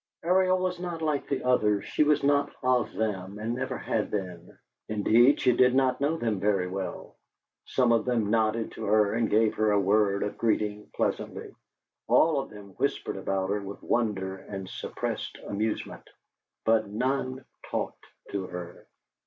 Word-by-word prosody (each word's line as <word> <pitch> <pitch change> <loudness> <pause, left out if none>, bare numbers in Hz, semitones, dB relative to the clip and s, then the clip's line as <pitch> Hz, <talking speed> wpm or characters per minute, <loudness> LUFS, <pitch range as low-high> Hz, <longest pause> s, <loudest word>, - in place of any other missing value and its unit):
Ariel 185 +2 +3
was 185 -1 -2
not 175 -2 -4
like 150 -3 -1
the 140 - -1
others; 105 -5 +2
she - - +2
was 150 -1 +2
not 140 0 +3
of 125 -2 +2
them, 100 -3 -3
and 110 +2 -2
never 130 +1 -3
had 110 -2 -1
been. 90 -4 -5 0.3
Indeed, 115 +5 +4
she 125 - +3
did 125 0 +4
not 130 -1 +2
know 150 +3 +1
them 110 -8 -1
very 100 -2 +1
well. 95 -1 -6 0.5
Some 125 -2 +2
of 115 -1 +3
them 115 -5 0
nodded 110 0 +1
to 110 - -6
her 105 0 +3
and 115 -1 +1
gave 110 0 +3
her 110 0 +1
a 105 -1 +3
word 100 0 +2
of 105 - -4
greeting 105 -2 0
pleasantly; - - -2 0.6
all 155 -3 +4
of 135 - -5
them 105 -1 -12
whispered - - -1
about 95 0 -1
her 105 0 0
with 100 0 -8
wonder 95 -5 -1
and 95 -1 -7
suppressed - - -4
amusement; 105 +2 -3 0.6
but 110 -1 +3
none 130 +3 -2 0.2
talked - - -4 0.2
to 100 -2 -3
her. 90 -1 -8
110 Hz, 165 wpm, -28 LUFS, 100-130 Hz, 0.6 s, Indeed